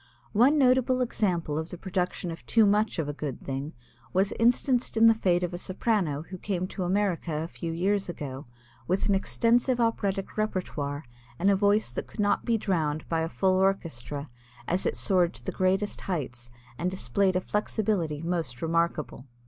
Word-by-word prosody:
One 255 +8 +5
notable 255 -1 +4
example 180 -11 0
of 160 +1 -5
the 180 - -6
production 180 -1 -2
of 165 - -8
too 225 -2 +5
much 210 +1 +2
of 160 -3 -1
a 145 - -3
good 145 -2 -5
thing 135 +3 -5 0.4
was 195 +2 +2
instanced 245 +1 +2
in 225 - +6
the 225 - +8
fate 180 -5 +1
of 175 - -2
a 175 - -4
soprano 185 -7 0
who 185 +2 -9
came 185 -2 -2
to - - -6
America 185 -2 0
a - - -4
few 170 -1 -5
years 195 +4 0
ago 140 -5 -6 0.4
with 185 +2 +1
an 200 - +3
extensive 235 +5 +2
operatic 200 -5 -1
repertoire 155 -9 -2 0.3
and 195 +3 +3
a - - +4
voice 205 - +2
that - - -4
could - - -14
not 205 0 +2
be 235 -2 +2
drowned 160 -7 -1
by 165 - +1
a 160 - -1
full 190 +1 +2
orchestra 155 -7 -1 0.4
as 180 +2 +1
it - - -1
soared 180 -3 +2
to - - -9
the - - -1
greatest 190 +2 0
heights 130 -9 -4 0.3
and 175 +3 0
displayed 185 +2 0
a 185 - +2
flexibility 195 -7 -1
most 165 -8 -3
remarkable. 165 -4 -1
185 Hz, 180 wpm, -28 LUFS, 165-210 Hz, 0.4 s, the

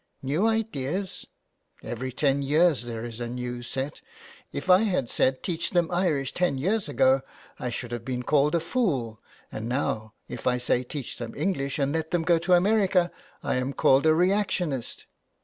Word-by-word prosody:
" - - -41
New 190 +9 +3
ideas! 195 -5 -2 0.6
Every 130 +2 -4
ten 140 +2 +1
years 150 -1 +3
there 115 -1 -5
is 115 -1 -7
a 120 - -3
new 125 0 -4
set. 135 +4 -4 0.5
If - - -5
I 185 0 +7
had 185 - 0
said 130 0 +1
teach 170 -1 -1
them 175 -1 +1
Irish 165 -7 0
ten 175 -6 +1
years 190 +6 0
ago 135 -1 +4 0.4
I 125 - -2
should 120 0 -5
have 120 -1 -4
been 125 0 -3
called 150 +3 +3
a - - +3
fool, 155 - -1 0.3
and 110 +2 -5
now 110 -5 -2
if - - -6
I 125 0 +3
say 125 0 +1
teach 135 +1 -6
them 115 -1 -6
English 140 -8 -1
and 140 -1 0
let 160 0 -1
them 175 -2 0
go 170 0 +3
to 175 +2 +2
America 185 -1 +3 0.3
I - - 0
am 130 +2 -2
called 135 +3 +4
a 155 - +5
reactionist. 180 - 0
140 Hz, 185 wpm, -26 LUFS, 125-180 Hz, 0.6 s, I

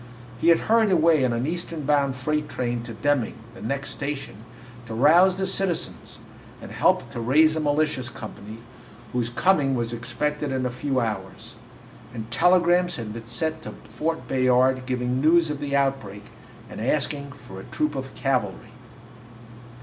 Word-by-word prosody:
He 165 - 0
had 165 - +5
hurried 225 -1 +3
away 165 -4 +4
on 125 - +2
an 120 +2 -1
Eastern 165 -1 -3
bound 140 -2 +2
freight 150 +4 -2
train 120 -1 -2
to 115 - -7
Deming, 145 -1 0 0.2
the - - -12
next 140 +5 -3
station, 140 -5 -5 0.5
to 110 - -5
rouse 175 +9 +5
the 190 - -1
citizens 190 -2 -2 0.4
and - - -10
help - - +1
to 120 - -5
raise 155 +7 +4
a - - 0
militia 150 -1 +1
company, 110 -1 -9 0.6
whose 120 -1 0
coming 140 0 +2
was 120 -1 -2
expected 140 +5 -2
in 130 -1 -1
a 125 - -1
few 130 +1 -1
hours. 105 -5 -4 0.6
And 115 0 -7
telegrams 175 +5 +3
had 110 -3 -6
been 115 0 -9
sent 160 +7 -2
to - - -8
Fort 160 +1 -3
Bayard 130 0 +2
giving 125 0 -1
news 165 +1 +4
of 145 - -4
the 140 -1 -2
outbreak 135 -8 -1 0.4
and - - -8
asking 140 -2 -1
for 95 -9 -11
a - - -9
troop 150 -1 -1
of 130 -1 -6
cavalry. 115 -4 -2
135 Hz, 165 wpm, -24 LUFS, 120-155 Hz, 0.6 s, had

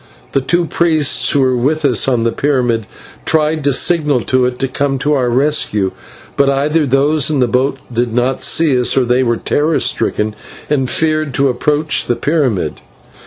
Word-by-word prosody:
The 135 - 0
two 175 +6 0
priests 160 -3 +1
who 140 - +2
were 130 -1 +2
with 145 +5 0
us 125 -6 +2
on 125 -3 +1
the 115 - +1
pyramid 125 -7 -1 0.4
tried 155 -1 0
to 140 - +3
signal 150 -2 +1
to 130 +5 +1
it 125 0 -2
to 135 - -1
come 135 +1 -2
to 145 +3 0
our 130 -4 +1
rescue, 120 -7 +1 0.4
but 140 -1 +2
either 145 +3 +1
those 140 +3 +1
in 150 -3 0
the 125 - +2
boat 130 +4 0 0.2
did 120 0 -1
not 125 +3 -1
see 160 -5 +2
us, 125 - +1
or 130 - +3
they 125 +2 +1
were 120 -2 0
terror 150 +6 0
stricken 105 0 -1 0.4
and 135 -4 0
feared 155 -3 0
to 140 0 +2
approach 150 +5 0
the 120 - 0
pyramid. 130 - -1
135 Hz, 185 wpm, -15 LUFS, 125-150 Hz, 0.4 s, to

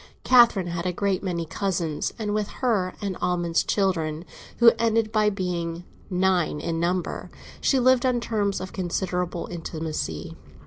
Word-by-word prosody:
Catherine 235 -7 +6
had 170 0 -3
a - - +1
great 195 +1 0
many 175 -4 -2
cousins, 170 -4 -2
and 210 -3 -2
with 210 -1 0 0.2
her 200 -7 +1
Aunt 195 -3 -2
Almond's 175 -1 +1
children, 165 -5 0 0.3
who 235 -1 +8
ended 225 -1 +2
by 215 -1 +3
being 175 -4 -3 0.3
nine 180 -4 +1
in 165 +1 -2
number, 175 +1 -2 0.3
she 270 - +3
lived 255 0 +4
on 250 -2 +2
terms 210 -4 -1
of 185 0 -7
considerable 180 -1 -2
intimacy. 160 - -4
185 Hz, 145 wpm, -25 LUFS, 170-210 Hz, 0.3 s, who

